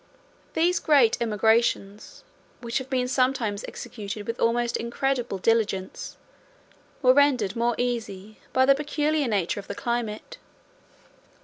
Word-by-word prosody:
10 320 - +2
These 360 +1 +2
great 265 -8 +3
emigrations, 220 -2 0 0.4
which 235 +1 -2
have 260 0 -9
been 255 -2 0
sometimes 255 -5 0
executed 205 -1 -7
with 230 +2 -4
almost 235 +1 +1
incredible 245 -2 -2
diligence, 205 -2 -1 0.9
were 255 0 +7
rendered 260 -8 +3
more 235 0 +1
easy 215 -4 -4
by 260 0 +3
the 275 - +6
peculiar 300 0 0
nature 200 -3 -1
of 195 - -10
the - - -5
climate. 235 -4 -4
235 Hz, 125 wpm, -25 LUFS, 215-260 Hz, 0.9 s, were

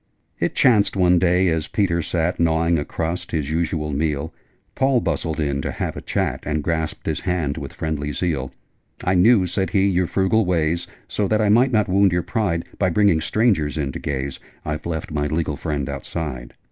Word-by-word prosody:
It - - -1
chanced 105 -6 +4
one 90 -2 +4
day, 90 +1 +3
as 80 -1 -1
Peter 90 -5 +1
sat 85 +2 -1
Gnawing 85 0 +2
a - - -1
crust 85 +3 -3
his 75 -3 -2
usual 80 -2 -1
meal 75 +1 -1 0.4
Paul 135 -1 +2
bustled 80 -7 -2
in 70 -2 0
to - - -3
have - - -3
a - - -6
chat, - - -1
And 75 0 -2
grasped 80 -1 -2
his - - -1
hand 80 -4 -1
with 70 - -7
friendly 75 -2 -3
zeal. 70 -4 -2 0.5
'I 90 - +2
knew,' 95 +2 +5
said 95 +2 -1
he, 100 -1 +2
'your 90 -2 +1
frugal 95 +5 +2
ways: 85 -1 0 0.2
So, 105 - -1
that 110 +2 +2
I 105 -2 +2
might 120 +5 +4
not 105 -4 +2
wound 95 0 +3
your 90 0 +1
pride 95 -7 -1
By 95 - +3
bringing 100 -3 +3
strangers 95 -11 +1
in 70 -3 -1
to - - -6
gaze, 70 -1 -3 0.3
I've 75 +1 -3
left 80 -2 -4
my 75 -1 0
legal 80 0 -1
friend 70 -3 -3
outside! 70 -3 -5
85 Hz, 195 wpm, -22 LUFS, 75-95 Hz, 0.5 s, knew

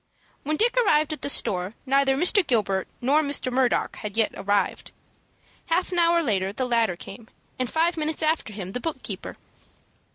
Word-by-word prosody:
When 305 +2 -2
Dick 470 +3 +2
arrived 310 -10 +3
at 305 - -7
the - - -2
store 185 -5 +1
neither 270 0 +3
Mr. 360 +7 +4
Gilbert 200 -6 0
nor 280 +5 +3
Mr. 285 -3 -2
Murdock 255 -1 +1
had 210 -1 -6
yet 225 - +3
arrived. 205 +1 -1 0.8
Half 350 +3 0
an 355 - 0
hour 340 0 +3
later 195 -7 0
the 255 +5 -2
latter 230 -6 +1
came, 205 +5 -11 0.3
and 255 -2 -1
five 335 +2 +1
minutes 315 0 -2
after 310 -7 0
him 190 -3 -7
the 250 - -3
book 320 +5 -4
keeper. - - -6
265 Hz, 175 wpm, -25 LUFS, 215-315 Hz, 0.8 s, Mr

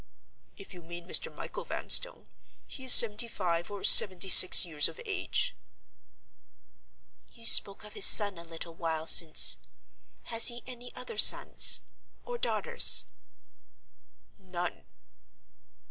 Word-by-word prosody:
"If 195 - -17
you 175 - -17
mean 170 +1 -15
Mr. - - -1
Michael - - -13
Vanstone, - - -3 0.4
he 265 - -14
is 255 - +1
seventy 230 0 +3
five 175 -6 -8
or 205 -1 -13
seventy 190 -1 +2
six 185 0 +5
years 155 -4 -1
of - - -16
age." 435 +4 -6 1.8
"You 230 -1 -17
spoke 200 -3 0
of 210 - -17
his - - +3
son 205 -5 +5
a - - -14
little 165 0 -14
while 160 -1 -9
since. 160 -1 +4 0.7
Has 230 -1 -1
he 240 -1 -3
any 245 -1 -14
other 460 -3 -11
sons—or 485 0 -1
daughters?" 480 -1 0 1.3
"None." 180 -2 -11
195 Hz, 120 wpm, -24 LUFS, 170-240 Hz, 1.8 s, six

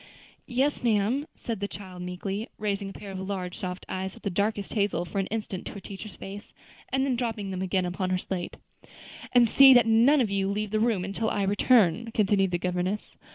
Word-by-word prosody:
"Yes, 270 +4 0
ma'am," 235 +5 +1
said 230 -4 -4
the 200 - -2
child 185 -3 -9
meekly, 190 +5 -4
raising 200 -2 -2
a - - -9
pair 205 -1 -9
of 190 - -5
large 190 -2 -4
soft 180 -2 -5
eyes 190 0 -4
of - - -16
the 200 - -1
darkest 205 +2 -1
hazel 200 -5 0
for 195 - -3
an 195 - -1
instant 210 -4 -4
to - - -7
her 200 - -7
teacher's 195 +2 -9
face, 200 +2 -9 0.4
and 265 0 +1
then 265 -2 +1
dropping 225 -5 -3
them 185 -1 -3
again 190 -1 0
upon 180 +1 -2
her 185 - +1
slate. 180 -1 -4 0.7
"And 245 -1 +6
see 270 +3 +8
that 240 -2 +6
none 235 +6 +5
of 225 -6 +1
you 195 -1 0
leave 210 0 -2
the 215 - +1
room 215 -5 +1
until 205 +3 -2
I 200 - 0
return," 205 0 +3
continued 195 -2 +3
the 175 - 0
governess. 180 +3 -2
200 Hz, 210 wpm, -27 LUFS, 190-225 Hz, 0.7 s, see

